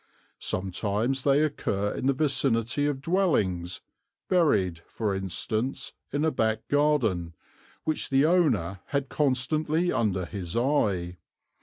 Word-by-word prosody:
Sometimes 105 Hz, +7 st, -1 dB
they 140 Hz, +2 st, +3 dB
occur 105 Hz, -9 st, -1 dB
in 130 Hz, -, -2 dB
the 140 Hz, -, +4 dB
vicinity 135 Hz, -2 st, +1 dB
of 135 Hz, -2 st, -3 dB
dwellings, 105 Hz, -, +1 dB, 0.5 s
buried 105 Hz, -, +2 dB
for 105 Hz, -3 st, -2 dB
instance 110 Hz, +6 st, -2 dB, 0.2 s
in 145 Hz, +3 st, 0 dB
a 160 Hz, -, +2 dB
back 110 Hz, -4 st, -1 dB
garden, 120 Hz, -, +1 dB, 0.5 s
which 155 Hz, -1 st, -1 dB
the 135 Hz, +2 st, +4 dB
owner 145 Hz, -, +2 dB
had 140 Hz, -1 st, -2 dB
constantly 155 Hz, +5 st, +1 dB
under 95 Hz, -5 st, 0 dB
his 90 Hz, 0 st, -5 dB
eye. 100 Hz, -10 st, +1 dB
125 Hz, 120 wpm, -27 LUFS, 95-145 Hz, 0.5 s, the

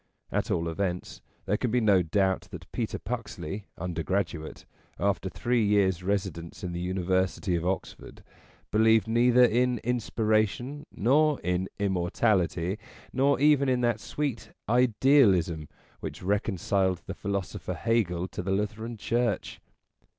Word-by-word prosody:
At -, -, -1 dB
all 85 Hz, 0 st, 0 dB
events, 90 Hz, +1 st, -3 dB, 0.2 s
there 105 Hz, -, +1 dB
can 125 Hz, -, -1 dB
be 125 Hz, +3 st, +2 dB
no 100 Hz, -5 st, +4 dB
doubt 95 Hz, +2 st, 0 dB
that 90 Hz, 0 st, -10 dB
Peter 115 Hz, -3 st, -2 dB
Puxley, 105 Hz, -5 st, -5 dB
undergraduate, 85 Hz, -1 st, -3 dB, 0.3 s
after 100 Hz, -1 st, 0 dB
three 120 Hz, +3 st, 0 dB
years' 100 Hz, -3 st, +2 dB
residence 90 Hz, -4 st, -3 dB
in 90 Hz, -, -3 dB
the 85 Hz, -, -4 dB
University 95 Hz, 0 st, 0 dB
of 85 Hz, +1 st, -1 dB
Oxford, 95 Hz, -, -5 dB, 0.5 s
believed 110 Hz, +1 st, +4 dB
neither 120 Hz, +2 st, +5 dB
in 125 Hz, +1 st, +2 dB
Inspiration 120 Hz, +4 st, 0 dB
nor 145 Hz, +6 st, +3 dB
in 90 Hz, +2 st, -1 dB
Immortality, 95 Hz, -1 st, 0 dB, 0.3 s
nor 140 Hz, +2 st, +3 dB
even 145 Hz, -1 st, +4 dB
in 125 Hz, -1 st, +2 dB
that 120 Hz, -2 st, +1 dB
sweet 140 Hz, -1 st, -3 dB, 0.2 s
Idealism 110 Hz, -, +3 dB, 0.3 s
which -, -, -7 dB
reconciled 95 Hz, -2 st, 0 dB
the -, -, -5 dB
philosopher 100 Hz, -3 st, -4 dB
Hegel 95 Hz, -7 st, 0 dB
to -, -, -5 dB
the 95 Hz, -, -5 dB
Lutheran 110 Hz, +4 st, -2 dB
Church. 115 Hz, +1 st, -1 dB
100 Hz, 130 wpm, -28 LUFS, 90-120 Hz, 0.5 s, neither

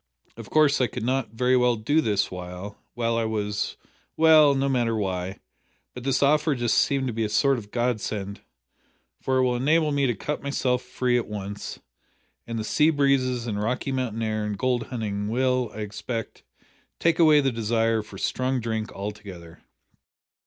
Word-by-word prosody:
Of -, -, -10 dB
course 150 Hz, -3 st, +3 dB
I 125 Hz, -, +3 dB
could 120 Hz, -1 st, -6 dB
not 130 Hz, 0 st, 0 dB
very 125 Hz, +3 st, +1 dB
well 125 Hz, -1 st, +3 dB
do 145 Hz, +9 st, +1 dB
this 105 Hz, -7 st, 0 dB
while 90 Hz, +2 st, -7 dB, 0.2 s
while 115 Hz, -1 st, 0 dB
I 115 Hz, -, 0 dB
was 105 Hz, -2 st, -2 dB, 0.4 s
well, 155 Hz, -3 st, +6 dB
no 135 Hz, 0 st, +1 dB
matter 120 Hz, -4 st, +1 dB
why, 95 Hz, -1 st, -3 dB, 0.6 s
but 125 Hz, -, -8 dB
this 135 Hz, +1 st, +1 dB
offer 150 Hz, +1 st, +3 dB
just 120 Hz, -2 st, 0 dB
seemed 135 Hz, -1 st, +1 dB
to 125 Hz, -, -2 dB
be 115 Hz, +1 st, -1 dB
a 105 Hz, -, -1 dB
sort 135 Hz, +4 st, +2 dB
of 105 Hz, -2 st, -12 dB
godsend, 105 Hz, -4 st, -2 dB, 0.8 s
for 130 Hz, 0 st, 0 dB
it 130 Hz, -, +3 dB
will 125 Hz, -1 st, +1 dB
enable 150 Hz, +5 st, +2 dB
me 140 Hz, -1 st, +2 dB
to 120 Hz, -, 0 dB
cut 150 Hz, +9 st, -4 dB
myself 130 Hz, -3 st, 0 dB
free 125 Hz, -1 st, 0 dB
at 120 Hz, -, -5 dB
once, 100 Hz, -1 st, -6 dB, 0.7 s
and 115 Hz, 0 st, -4 dB
the 110 Hz, -, -2 dB
sea 150 Hz, +8 st, +3 dB
breezes 135 Hz, -5 st, +1 dB
and 105 Hz, -3 st, -3 dB
Rocky 125 Hz, +5 st, -1 dB
Mountain 125 Hz, -4 st, -2 dB
air 110 Hz, -1 st, -1 dB
and 105 Hz, -1 st, -3 dB
gold 125 Hz, -1 st, 0 dB
hunting 105 Hz, -4 st, -3 dB
will, 125 Hz, +1 st, +1 dB
I 110 Hz, -, -7 dB
expect, 105 Hz, +2 st, -5 dB, 0.6 s
take 170 Hz, 0 st, +1 dB
away 155 Hz, -3 st, +6 dB
the 135 Hz, -2 st, +1 dB
desire 115 Hz, 0 st, +1 dB
for 105 Hz, -2 st, -12 dB
strong 130 Hz, +5 st, -1 dB
drink 110 Hz, -2 st, -3 dB
altogether." 95 Hz, -5 st, -8 dB
120 Hz, 180 wpm, -25 LUFS, 105-130 Hz, 0.8 s, well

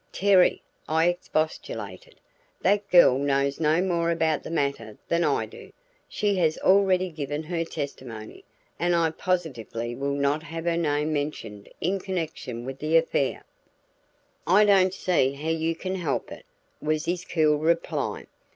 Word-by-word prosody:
"Terry," 195 Hz, -2 st, +3 dB, 0.3 s
I 160 Hz, +2 st, +3 dB
expostulated, 160 Hz, -3 st, -4 dB, 0.5 s
"that 200 Hz, +1 st, +2 dB
girl 175 Hz, -7 st, +6 dB
knows 140 Hz, 0 st, 0 dB
no 160 Hz, +3 st, +2 dB
more 170 Hz, -3 st, 0 dB
about 160 Hz, -2 st, +1 dB
the -, -, -8 dB
matter 140 Hz, -9 st, -2 dB
than 170 Hz, 0 st, +1 dB
I -, -, +1 dB
do. -, -, -13 dB, 0.4 s
She 205 Hz, -1 st, 0 dB
has 160 Hz, -3 st, +2 dB
already 185 Hz, -1 st, +3 dB
given 145 Hz, -1 st, -4 dB
her 165 Hz, +1 st, -2 dB
testimony, 130 Hz, -8 st, -7 dB, 0.4 s
and 175 Hz, 0 st, +2 dB
I 165 Hz, -1 st, +2 dB
positively 120 Hz, -, -3 dB
will 140 Hz, +3 st, -2 dB
not 140 Hz, +2 st, +1 dB
have 165 Hz, 0 st, -7 dB
her 170 Hz, -1 st, +1 dB
name 150 Hz, -2 st, 0 dB
mentioned 115 Hz, -9 st, -4 dB
in 190 Hz, +4 st, 0 dB
connection 160 Hz, -10 st, -4 dB
with 135 Hz, +1 st, -6 dB
the 155 Hz, +2 st, +3 dB
affair." 155 Hz, -4 st, 0 dB, 1.0 s
"I 200 Hz, +4 st, +6 dB
don't 190 Hz, -2 st, +5 dB
see 145 Hz, -9 st, +1 dB
how 150 Hz, +3 st, -5 dB
you 165 Hz, 0 st, 0 dB
can 185 Hz, +3 st, -4 dB
help 180 Hz, -3 st, -2 dB
it," -, -, -11 dB, 0.3 s
was 155 Hz, 0 st, -1 dB
his 175 Hz, +1 st, -2 dB
cool 155 Hz, -4 st, +2 dB
reply. 165 Hz, +2 st, -1 dB
160 Hz, 150 wpm, -26 LUFS, 140-175 Hz, 1.0 s, girl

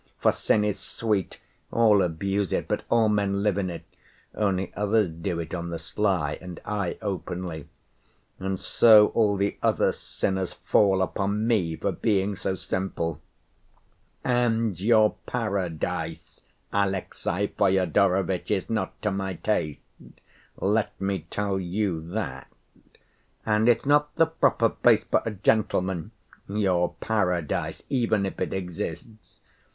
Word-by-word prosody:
For -, -, +4 dB
sin 105 Hz, -, +1 dB
is 105 Hz, -1 st, -1 dB
sweet; 105 Hz, -5 st, -2 dB, 0.3 s
all 110 Hz, -4 st, +5 dB
abuse 95 Hz, +3 st, -1 dB
it, -, -, -1 dB
but -, -, -1 dB
all 115 Hz, -2 st, +4 dB
men 100 Hz, -1 st, +1 dB
live 100 Hz, -2 st, +1 dB
in 95 Hz, -2 st, -1 dB
it, 85 Hz, -1 st, -7 dB, 0.5 s
only 95 Hz, -3 st, -1 dB
others 105 Hz, -2 st, +1 dB
do 85 Hz, +2 st, -3 dB
it 80 Hz, -1 st, -6 dB
on 85 Hz, -1 st, -3 dB
the 85 Hz, -, -3 dB
sly, 80 Hz, -2 st, -1 dB
and 90 Hz, -1 st, -8 dB
I 100 Hz, -4 st, -2 dB
openly. 90 Hz, -5 st, -4 dB, 0.7 s
And 95 Hz, 0 st, -2 dB
so 110 Hz, -2 st, +6 dB
all 105 Hz, -3 st, +2 dB
the 100 Hz, +1 st, -1 dB
other -, -, +2 dB
sinners 95 Hz, -1 st, -3 dB
fall 95 Hz, -2 st, +3 dB
upon 100 Hz, +3 st, -1 dB
me 95 Hz, -9 st, +1 dB
for -, -, -1 dB
being 100 Hz, -2 st, 0 dB
so 95 Hz, 0 st, -2 dB
simple. 85 Hz, -5 st, -3 dB, 1.0 s
And 115 Hz, -6 st, +1 dB
your 110 Hz, 0 st, +4 dB
paradise, 100 Hz, -9 st, -3 dB, 0.3 s
Alexey 100 Hz, 0 st, -1 dB
Fyodorovitch, 95 Hz, -1 st, +2 dB
is 100 Hz, -1 st, -1 dB
not 110 Hz, -, -2 dB
to 105 Hz, -, +1 dB
my 95 Hz, -1 st, -3 dB
taste, 85 Hz, -9 st, -1 dB, 0.8 s
let 105 Hz, +1 st, 0 dB
me 95 Hz, -3 st, -2 dB
tell 100 Hz, -2 st, -1 dB
you 90 Hz, -2 st, -1 dB
that; 85 Hz, -10 st, -4 dB, 1.0 s
and 110 Hz, +1 st, +3 dB
it's 120 Hz, -, +3 dB
not 145 Hz, +1 st, +3 dB
the 165 Hz, -, +5 dB
proper 160 Hz, 0 st, +2 dB
place -, -, +3 dB
for -, -, +1 dB
a -, -, +2 dB
gentleman, 95 Hz, -4 st, 0 dB, 0.4 s
your 95 Hz, -4 st, +1 dB
paradise, 90 Hz, -8 st, -1 dB
even 115 Hz, -6 st, +1 dB
if 95 Hz, -, -5 dB
it -, -, -1 dB
exists. 90 Hz, +3 st, -6 dB
100 Hz, 135 wpm, -26 LUFS, 90-105 Hz, 1.0 s, so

